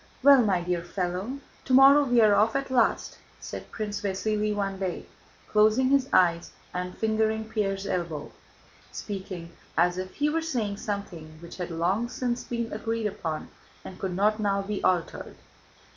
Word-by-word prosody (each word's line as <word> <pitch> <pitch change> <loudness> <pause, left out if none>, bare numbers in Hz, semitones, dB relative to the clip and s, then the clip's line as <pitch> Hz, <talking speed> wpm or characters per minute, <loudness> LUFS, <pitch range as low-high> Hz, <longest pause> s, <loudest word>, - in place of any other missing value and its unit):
"Well, 280 -2 +8
my 195 -6 +1
dear 175 0 -1
fellow, 185 +7 -3 0.3
tomorrow 275 +2 +6
we 245 -2 +4
are 215 -2 +6
off 215 +3 +3
at 275 -1 -2
last," 240 -3 +1 0.2
said - - -8
Prince 210 -2 -4
Vasíli 210 +1 -1
one 195 -2 -2
day, 185 -2 -3 0.4
closing 215 +5 +3
his 275 -1 +2
eyes 170 -2 +3 0.2
and 180 0 -4
fingering 220 0 0
Pierre's 200 -3 -2
elbow, 170 -6 -3 0.6
speaking 185 -4 -6 0.3
as 180 +2 +3
if 185 0 -6
he 295 - +1
were 325 +2 0
saying 230 -11 -2
something 175 -7 -6
which 170 +1 -11
had 180 -1 -4
long 185 +8 0
since 245 -1 -2
been 235 -1 -4
agreed 225 +1 -2
upon 160 -6 -4 0.4
and 185 - -9
could 185 -2 -3
not 210 +3 +2
now 200 -2 0
be 205 0 -4
altered. 180 -3 -1
205 Hz, 160 wpm, -27 LUFS, 180-230 Hz, 0.6 s, Well